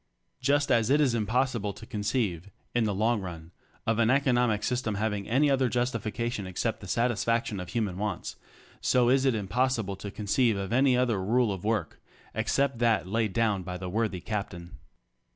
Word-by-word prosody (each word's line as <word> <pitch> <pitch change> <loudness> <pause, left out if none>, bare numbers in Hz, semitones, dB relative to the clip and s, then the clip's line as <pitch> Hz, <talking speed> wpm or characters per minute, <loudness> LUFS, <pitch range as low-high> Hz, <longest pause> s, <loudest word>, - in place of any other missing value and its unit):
Just 145 0 +2
as 115 -2 +3
it 145 +2 +4
is 140 -5 +3
impossible 115 -1 0
to 110 - -11
con 105 -2 -5
ceive, 100 -5 -1 0.2
in 120 -2 +2
the 105 - 0
long 110 +2 +1
run, 85 -3 -8 0.3
of 115 0 +1
an 115 -1 +4
economic 125 -5 +2
system 125 -4 -1
having 105 -1 -2
any 135 +6 +3
other 135 -3 +2
justification 115 -3 -2
except 95 - -2
the - - -8
satisfaction 115 -3 0
of 90 - -6
human 105 -6 -2
wants, 105 0 -3 0.5
so 125 -1 +3
is 135 +1 +3
it 130 -3 +3
impossible 110 0 0
to 100 - -6
conceive 105 +2 +1
of 100 +2 -3
any 130 0 +4
other 115 -7 +1
rule 115 +1 +2
of 95 - -7
work 105 -7 -1 0.3
ex 110 +1 -1
cept 135 -3 +1
that 115 -7 +2
laid 110 +2 0
down 110 -3 +1
by 90 0 -5
the 90 0 -5
worthy 105 -2 -1
Captain. 95 -5 -5
110 Hz, 185 wpm, -28 LUFS, 100-125 Hz, 0.5 s, it